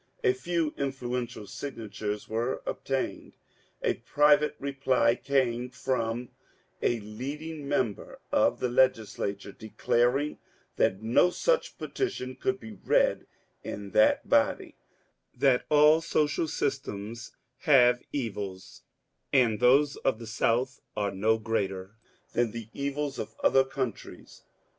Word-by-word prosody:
A 395 -3 +4
few 170 - -1
influeur 125 -3 -2
tial 110 -4 -10
signatures 105 -6 -5
were 115 +4 -2
obtained. 135 -1 -3 0.5
A - - +2
private 150 +1 +3
reply 135 -4 +2
came 125 -2 0
from 125 -2 -2 0.5
a 120 - +1
leading 140 +8 -6
member 125 -7 -2
of - - +3
the 125 - 0
Legislature, 110 -5 0
declaring 120 +7 0 0.4
that 95 +3 +1
no 120 +10 +4
such 485 - 0
petition 130 - -3
could 195 +8 -1
be 225 - -9
read - - +1 0.4
in 100 -1 -6
that 110 - +4
body; - - +2 0.6
that 130 -1 +3
all 150 +2 +6
social 155 0 0
systems 115 -6 -4 0.2
have 125 -6 +5
evils, 100 -8 -5 0.5
and 120 -6 +3
those 135 +4 +4
of 130 - 0
the 115 - -9
South 120 +4 0 0.2
were 100 -1 0
no 110 +4 +2
greater 100 -3 -2 0.4
than 120 -1 +2
the 115 0 -8
evils 140 0 -3
of - - -6
other 135 - +5
countries. 130 -4 -6
125 Hz, 120 wpm, -28 LUFS, 110-145 Hz, 0.6 s, all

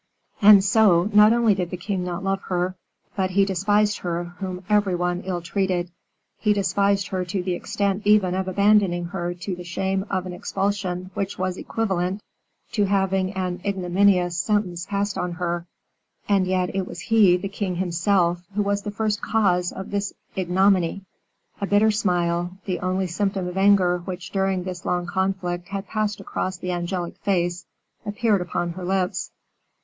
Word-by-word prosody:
And 205 -1 +8
so, 200 -2 +4
not 210 +1 +7
only 230 -2 +4
did 180 -3 -2
the 180 - -5
king 190 0 -3
not 180 +1 -4
love 195 0 0
her, 180 0 0 0.4
but 190 -2 0
he 195 +1 +3
despised 205 +2 +1
her 175 -1 -2 0.2
whom 185 -1 -5
every 205 -3 +2
one 175 0 -1
ill 180 -2 -3
treated, 180 -1 -1 0.5
he 210 -1 +3
despised 200 0 +1
her 185 -1 -1
to 180 +1 -3
the 180 0 -1
extent 200 +3 -1
even 205 -4 +4
of 190 0 -2
abandoning 195 -2 +3
her 175 -1 -4
to 180 +2 -5
the 180 - -8
shame 190 +2 -2
of 185 -2 -1
an 180 - -6
expulsion 190 -1 -2
which 200 0 -3
was 185 0 -1
equivalent 190 -3 -2 0.5
to 210 -3 +2
having 190 -1 +1
an 185 -1 -3
ignominious 185 -2 +2
sentence 185 -3 -1
passed 200 0 -1
on 180 -1 -2
her; 175 0 -3 0.6
and 195 -2 +2
yet, 185 0 0
it 190 -1 -1
was 170 - -8
he, 205 -4 +4
the 195 - -4
king 195 -2 -3
himself, 175 0 +1
who 205 - +2
was 200 0 0
the 205 - -5
first 210 0 -1
cause 180 -5 +1
of 190 - -8
this 200 -1 -2 0.2
ignominy. 190 0 +2 0.6
A 200 - -1
bitter 205 +2 +4
smile, 175 -3 0
the 185 -2 -2
only 185 +1 -1
symptom 190 +1 -1
of 180 - -6
anger 190 -2 +4
which 180 0 -7
during 190 -2 0
this 180 -2 -6
long 175 0 -1
conflict 180 -1 -2
had 195 0 -5
passed 210 -1 -1
across 185 -1 -3
the 180 0 -4
angelic 175 0 -3
face, 175 -3 -1 0.4
appeared 210 -1 +1
upon 175 -1 -2
her 180 +2 -7
lips. 185 0 -1
190 Hz, 170 wpm, -23 LUFS, 180-200 Hz, 0.6 s, And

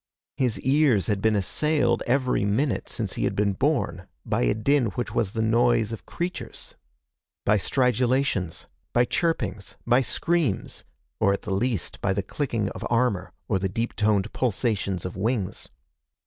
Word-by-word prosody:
His 125 -5 0
ears 135 -6 +3
had 100 -2 -1
been 110 0 +3
assailed 145 - +1
every 130 -3 +2
minute 115 +7 0
since - - -3
he - - -2
had - - -1
been 100 -1 +2
born - - 0 0.2
by - - 0
a - - +2
din 130 +3 +2
which 120 - -3
was 100 -4 0
the 110 - 0
noise 115 0 +3
of 115 - -7
creatures. 175 +1 -5 0.7
By 105 +1 +4
stridulations, 125 - +1 0.3
by 120 0 +4
chirpings, 120 - -1
by 120 +2 +4
screams, 165 - 0 0.4
or 100 - +4
at 100 - -4
the 105 -4 -2
least 110 -1 -1
by 95 - +1
the 100 0 -1
clicking 115 -2 -2
of - - -8
armor 120 -5 +1 0.2
or 95 - +1
the 95 +1 -1
deep 115 +5 -2
toned 105 -1 +1
pulsations 100 -6 -1
of 90 - -5
wings. 100 -1 -2
115 Hz, 160 wpm, -25 LUFS, 100-130 Hz, 0.7 s, By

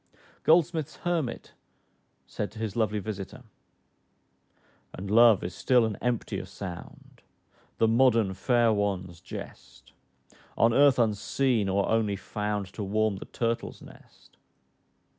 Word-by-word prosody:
Goldsmith's 160 -2 +2
Hermit 165 -9 -2 0.7
said 105 - -4
to - - -13
his 110 -3 -4
lovely 110 -2 0
visiter, 105 +4 -6 1.5
"And 95 +2 -6
love 115 -2 +6
is 90 - -4
still 125 +2 +3
an 110 -2 -3
emptier 120 -2 -2
sound, 90 -4 -10 0.6
The 115 - +3
modern 115 -4 +3
fair 115 +3 +2
one's 95 -4 -2
jest; - - -11 0.6
On 115 0 +4
earth 140 0 +5
unseen, 115 0 +1
or 100 +1 +1
only 110 -2 +1
found 105 +1 -3
To 105 - -5
warm 105 +1 0
the - - -8
turtle's 115 -1 -3
nest." - - -18
110 Hz, 120 wpm, -27 LUFS, 100-120 Hz, 1.5 s, love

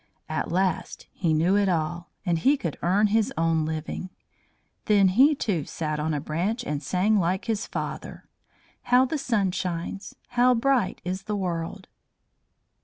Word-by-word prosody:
At - - -3
last 185 +1 -1
he 170 -4 -1
knew 165 +5 +3
it 200 -1 +3
all, 170 0 -2 0.2
and 170 -3 +1
he 275 - +4
could 165 - -3
earn 195 +5 +3
his 215 +1 +2
own 165 -1 +2
living. 160 +3 -4 0.8
Then 200 -3 +5
he, 270 +10 +5
too, 180 - -1
sat 155 -2 -3
on 155 +1 -1
a 150 - -1
branch 180 - -2
and 150 -9 -3
sang 190 +8 +2
like 185 +1 0
his 225 -2 -2
father: - - -6 0.6
"How 250 +1 +5
the 295 +4 -2
sun 210 -8 +1
shines! 180 +3 -4
How 245 +1 +4
bright 250 -3 +1
is 185 +2 -3
the 210 - -2
world!" 180 0 -3
185 Hz, 160 wpm, -26 LUFS, 165-215 Hz, 0.8 s, Then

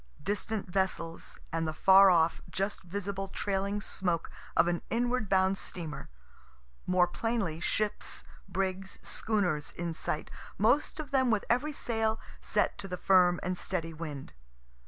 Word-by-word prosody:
Distant 205 +3 -1
vessels, 180 -3 -2 0.2
and 165 -1 0
the 155 - -3
far 195 +3 +8
off, 165 -2 +3
just 195 +2 -2
visible 195 +2 -4
trailing 200 +1 -1
smoke 175 -5 -2 0.3
of 170 - +6
an 175 -1 0
inward 240 -2 0
bound 190 0 +3
steamer; 160 -4 -7 0.8
more 180 -1 +5
plainly, 195 -4 -2
ships, 210 +5 -1 0.3
brigs, 190 +1 -2
schooners, 180 -9 0
in 170 -1 -4
sight, 155 -1 -3 0.3
most 255 +10 +2
of 295 -3 -5
them 260 -2 +3
with 220 -3 +2
every 265 +6 +2
sail 225 -5 0 0.2
set - - 0
to 195 - -5
the 180 -1 -4
firm 180 -2 +5
and 180 0 -1
steady 165 -3 -3
wind. 150 -4 -7
190 Hz, 140 wpm, -31 LUFS, 175-210 Hz, 0.8 s, far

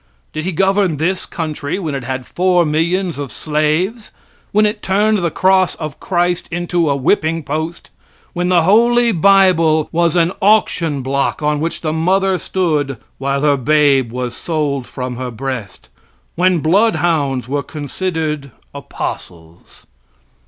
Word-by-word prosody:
Did 155 +1 -4
He 190 - -1
govern 190 -1 +1
this 180 +5 -1
country 155 -1 -4
when 165 -7 -4
it 135 -2 -4
had 130 0 -4
four 180 +6 +2
millions 165 +2 0
of 140 -3 -5
slaves? 155 +9 -1 0.4
when 210 +1 +3
it 210 0 -1
turned 210 +2 +2
the 175 -2 0
cross 185 +2 +2
of 155 -3 -7
Christ 175 -1 -1
into 175 -1 -1
a 140 - +2
whipping 160 +3 0
post 155 +4 -4 0.4
when 180 0 -1
the 175 -2 +4
holy 235 +5 +4
bible 170 -4 +4
was 170 -1 +1
an 170 0 +3
auction 170 -8 +2
block 140 +3 -1
on 150 0 +1
which 165 +2 -3
the 155 -2 -2
mother 185 +3 +1
stood 150 -8 -1 0.2
while 140 +1 -1
her 145 -1 +3
babe 140 -2 +2
was 125 -1 -4
sold 145 -6 -2
from 125 -1 -5
her 130 0 -4
breast? 125 -2 -6 0.5
when 180 -1 +2
bloodhounds 160 - +1
were 140 +2 -1
considered 150 0 -4 0.2
apostles? 85 0 -8
160 Hz, 145 wpm, -17 LUFS, 140-185 Hz, 0.5 s, the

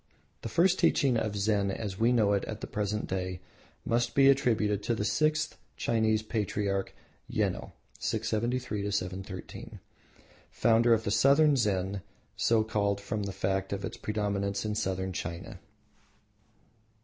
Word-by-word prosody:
The 115 - -5
first 175 - +3
teaching 135 -5 +3
of 110 -2 -1
Zen 100 -1 +1
as 95 -1 -4
we 115 +2 +4
know 110 -4 +3
it 100 - +1
at 110 -1 -6
the - - -3
present 105 0 -2
day 95 -1 -3 0.5
must 120 0 0
be 135 0 +7
attributed 110 -7 +2
to 115 - 0
the 105 - -2
sixth 155 +3 +1 0.2
Chinese 110 -1 +1
patriarch 100 -3 -2 0.4
Yeno(637 115 -1 -2
713), 95 -1 -5 0.7
founder 115 0 +4
of 110 -2 -1
Southern 145 +3 +5
Zen, 100 -5 0 0.3
so 115 -1 +3
called 100 -2 0
from 105 +1 -3
the 100 -1 -3
fact 95 0 -1
of 100 0 -2
its - - -6
predominance 100 -1 -2
in 105 - -1
Southern 95 -2 -2
China. 85 0 -6
105 Hz, 135 wpm, -29 LUFS, 100-115 Hz, 0.7 s, be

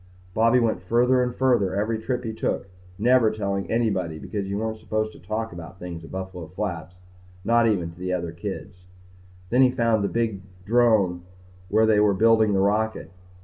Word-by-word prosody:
Bobby 115 +4 +4
went 110 -6 0
further 120 +6 +3
and 125 -1 -1
further 120 -8 +2
every 110 +2 -1
trip 125 +2 -3
he 110 -2 -4
took, 110 - -2 0.3
never 120 +1 +4
telling 100 -2 -3
anybody 100 -8 0
because 100 +4 -5
you 100 +1 -2
weren't 110 0 -3
supposed 110 0 -2
to - - -15
talk 110 +3 -4
about 85 +2 -10
things 85 -3 -7
at 80 - -11
Buffalo 95 -3 -6
Flats 90 -1 -5 0.5
not 115 +1 +4
even 90 -6 0
to 85 - -17
the 90 0 -3
other 85 -2 -2
kids. 90 +1 -7 0.7
Then 125 +2 +4
he 130 - +6
found 115 -4 +1
the 100 - 0
big 115 -4 -1 0.2
drome 110 -6 +3 0.5
where 110 +3 +4
they 110 -1 +4
were 105 -1 +3
building 110 0 +4
the 95 - +2
rocket. 105 0 0
105 Hz, 185 wpm, -24 LUFS, 95-115 Hz, 0.7 s, he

